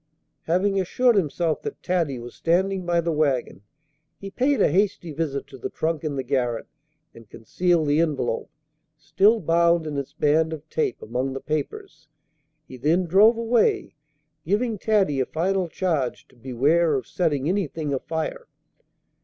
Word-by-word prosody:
Having 190 Hz, +3 st, +1 dB
assured 240 Hz, +6 st, +2 dB
himself 165 Hz, -3 st, 0 dB
that -, -, -7 dB
Taddy 170 Hz, -7 st, 0 dB
was 120 Hz, 0 st, -9 dB
standing 185 Hz, +2 st, 0 dB
by 170 Hz, -1 st, +2 dB
the 170 Hz, 0 st, -1 dB
wagon, 145 Hz, -9 st, 0 dB, 0.6 s
he 195 Hz, 0 st, -8 dB
paid 265 Hz, +6 st, +1 dB
a -, -, +3 dB
hasty 185 Hz, -3 st, 0 dB
visit 145 Hz, -2 st, -3 dB
to 135 Hz, -, -13 dB
the -, -, -4 dB
trunk 160 Hz, -1 st, -2 dB
in 150 Hz, -2 st, -2 dB
the 135 Hz, -, -2 dB
garret, 120 Hz, -2 st, -1 dB, 0.5 s
and 115 Hz, -3 st, -16 dB
concealed 170 Hz, +8 st, 0 dB
the 145 Hz, +2 st, +2 dB
envelope, 140 Hz, -8 st, -1 dB, 0.5 s
still 200 Hz, +8 st, +3 dB
bound 170 Hz, -1 st, +2 dB
in 150 Hz, -2 st, -4 dB
its 140 Hz, +1 st, -7 dB
band 155 Hz, +1 st, +2 dB
of 155 Hz, 0 st, -9 dB
tape, 155 Hz, -6 st, -1 dB
among 125 Hz, +4 st, -2 dB
the 135 Hz, -, -4 dB
papers. 155 Hz, +1 st, -5 dB, 0.6 s
He 130 Hz, -, -10 dB
then 165 Hz, +8 st, +1 dB
drove 205 Hz, +7 st, +5 dB
away, 230 Hz, 0 st, +1 dB, 0.5 s
giving 210 Hz, +5 st, -1 dB
Taddy 195 Hz, -11 st, +1 dB
a 130 Hz, -, +1 dB
final 185 Hz, +3 st, 0 dB
charge 160 Hz, -7 st, -2 dB
to -, -, -23 dB
beware 140 Hz, +7 st, +1 dB
of 130 Hz, -, -2 dB
setting 150 Hz, -6 st, -1 dB
anything 160 Hz, -5 st, -2 dB
afire. 160 Hz, -, -4 dB
160 Hz, 155 wpm, -24 LUFS, 140-185 Hz, 0.6 s, drove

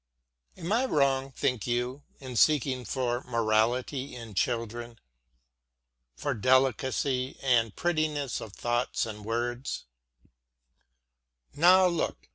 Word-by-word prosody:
Am 170 Hz, -, -5 dB
I 245 Hz, +4 st, +3 dB
wrong, 135 Hz, -, +1 dB
think 125 Hz, -4 st, -1 dB
you, 125 Hz, +3 st, -1 dB, 0.2 s
in 130 Hz, -2 st, -8 dB
seeking 130 Hz, -2 st, +3 dB
for 120 Hz, +2 st, -1 dB
morality 120 Hz, +4 st, 0 dB
in 115 Hz, -3 st, -9 dB
children 115 Hz, +3 st, -2 dB, 1.2 s
for 60 Hz, -, -2 dB
delicacy 130 Hz, +2 st, +1 dB
and 115 Hz, -5 st, +2 dB
prettiness 155 Hz, -6 st, -1 dB
of 105 Hz, -, -9 dB
thought 120 Hz, +3 st, -1 dB
and 105 Hz, -2 st, -7 dB
word? 120 Hz, +4 st, -2 dB, 1.8 s
Now 185 Hz, +4 st, +6 dB
look! 170 Hz, -2 st, -1 dB
125 Hz, 100 wpm, -28 LUFS, 115-140 Hz, 1.8 s, Now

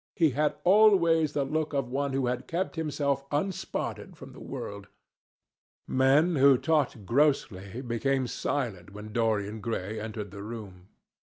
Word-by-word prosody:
He 160 Hz, -4 st, +3 dB
had 150 Hz, +3 st, 0 dB
always 175 Hz, -6 st, +5 dB
the 145 Hz, -, +1 dB
look 155 Hz, +2 st, -2 dB
of 135 Hz, -3 st, -1 dB
one 140 Hz, +1 st, -1 dB
who 135 Hz, -1 st, 0 dB
had 125 Hz, +1 st, -2 dB
kept 180 Hz, +3 st, -2 dB
himself 145 Hz, -3 st, -1 dB
unspotted 185 Hz, +5 st, -3 dB
from -, -, -11 dB
the -, -, -12 dB
world. 100 Hz, 0 st, -7 dB, 1.0 s
Men 145 Hz, +6 st, +3 dB
who 135 Hz, -1 st, +6 dB
talked 145 Hz, -8 st, 0 dB
grossly 120 Hz, -5 st, +1 dB
became 130 Hz, +2 st, 0 dB
silent 110 Hz, -7 st, -3 dB
when 105 Hz, +1 st, -9 dB
Dorian 110 Hz, -2 st, 0 dB
Gray 110 Hz, -2 st, -3 dB
entered 105 Hz, -2 st, -6 dB
the 100 Hz, 0 st, -8 dB
room. 100 Hz, -4 st, -9 dB
135 Hz, 145 wpm, -28 LUFS, 110-150 Hz, 1.0 s, who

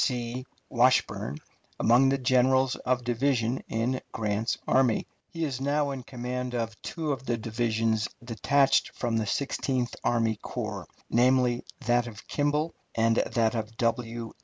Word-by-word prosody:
C. 125 Hz, 0 st, -2 dB, 0.2 s
Washburn 120 Hz, -, +2 dB, 0.4 s
among 125 Hz, +4 st, +5 dB
the 135 Hz, -, +2 dB
generals 130 Hz, 0 st, +3 dB
of 125 Hz, -1 st, -1 dB
division 120 Hz, 0 st, 0 dB
in 120 Hz, +3 st, -1 dB
Grant's 110 Hz, +1 st, -1 dB
army. 130 Hz, -4 st, +3 dB, 0.2 s
He 165 Hz, -1 st, -4 dB
is 135 Hz, -4 st, -4 dB
now 145 Hz, +1 st, +1 dB
in 135 Hz, -1 st, -5 dB
command 125 Hz, 0 st, -4 dB
of 115 Hz, -2 st, -2 dB
two 160 Hz, -3 st, -3 dB
of 135 Hz, -1 st, -4 dB
the 120 Hz, -, +1 dB
divisions 110 Hz, 0 st, 0 dB, 0.2 s
detached 135 Hz, +3 st, +2 dB
from 115 Hz, -2 st, -1 dB
the 110 Hz, -2 st, -1 dB
Sixteenth 130 Hz, -1 st, -1 dB
Army 115 Hz, -2 st, +1 dB
Corps -, -, -5 dB, 0.2 s
namely, 125 Hz, 0 st, +3 dB, 0.2 s
that 120 Hz, +1 st, +2 dB
of 105 Hz, -3 st, -10 dB
Kimball 150 Hz, +2 st, 0 dB, 0.2 s
and 115 Hz, 0 st, +3 dB
that 115 Hz, -2 st, +1 dB
of 115 Hz, -1 st, -4 dB
W. 115 Hz, -1 st, -1 dB
120 Hz, 140 wpm, -28 LUFS, 115-130 Hz, 0.4 s, among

